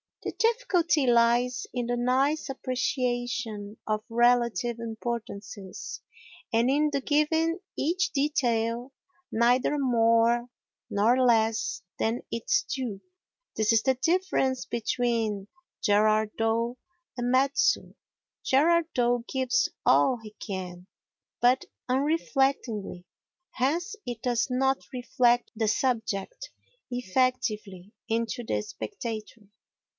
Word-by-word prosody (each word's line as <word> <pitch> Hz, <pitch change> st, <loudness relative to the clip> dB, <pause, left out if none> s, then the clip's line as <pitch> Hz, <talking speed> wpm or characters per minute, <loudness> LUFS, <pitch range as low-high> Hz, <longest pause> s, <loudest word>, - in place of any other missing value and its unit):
The -, -, -2 dB
difficulty 360 Hz, -, +2 dB
lies 235 Hz, -1 st, +3 dB
in 245 Hz, -1 st, -2 dB
the 245 Hz, 0 st, 0 dB
nice 270 Hz, +5 st, +1 dB
appreciation 245 Hz, -5 st, -2 dB
of 215 Hz, 0 st, -1 dB
relative 235 Hz, -1 st, +2 dB
importances 220 Hz, -4 st, -6 dB, 0.5 s
and 230 Hz, +2 st, +3 dB
in 300 Hz, +2 st, +3 dB
the 280 Hz, -1 st, -1 dB
giving 320 Hz, +4 st, +1 dB, 0.2 s
each 350 Hz, +7 st, 0 dB
detail 245 Hz, -3 st, 0 dB, 0.4 s
neither 245 Hz, +5 st, +3 dB
more 235 Hz, -1 st, +3 dB, 0.4 s
nor 235 Hz, +6 st, +3 dB
less 230 Hz, -, +2 dB
than 225 Hz, +2 st, 0 dB
its 410 Hz, -, +1 dB
due. 240 Hz, -, -4 dB, 0.5 s
This 220 Hz, +1 st, +2 dB
is 225 Hz, -, +4 dB
the 265 Hz, -1 st, +2 dB
difference 270 Hz, -4 st, 0 dB
between 225 Hz, -4 st, -1 dB, 0.4 s
Gerard 215 Hz, +1 st, +3 dB
Dow 230 Hz, +2 st, 0 dB, 0.4 s
and 245 Hz, 0 st, -1 dB
Metsu. 275 Hz, +9 st, +2 dB, 0.5 s
Gerard 330 Hz, +5 st, +4 dB
Dow 245 Hz, -1 st, +2 dB
gives 255 Hz, -1 st, +1 dB, 0.2 s
all 260 Hz, -2 st, +4 dB
he 215 Hz, -1 st, -11 dB
can, 180 Hz, -2 st, -6 dB, 0.5 s
but 250 Hz, +2 st, +4 dB, 0.2 s
unreflectingly; 265 Hz, -, 0 dB, 0.5 s
hence 330 Hz, -, -1 dB
it 240 Hz, -2 st, -5 dB
does 240 Hz, -2 st, +1 dB
not 265 Hz, +1 st, +2 dB
reflect 245 Hz, -1 st, +2 dB
the 220 Hz, 0 st, 0 dB
subject 245 Hz, -, -1 dB, 0.4 s
effectively 215 Hz, -5 st, -1 dB, 0.2 s
into 230 Hz, +1 st, -1 dB
the 105 Hz, -, -1 dB
spectator. 215 Hz, -, -7 dB
245 Hz, 100 wpm, -27 LUFS, 225-265 Hz, 0.5 s, is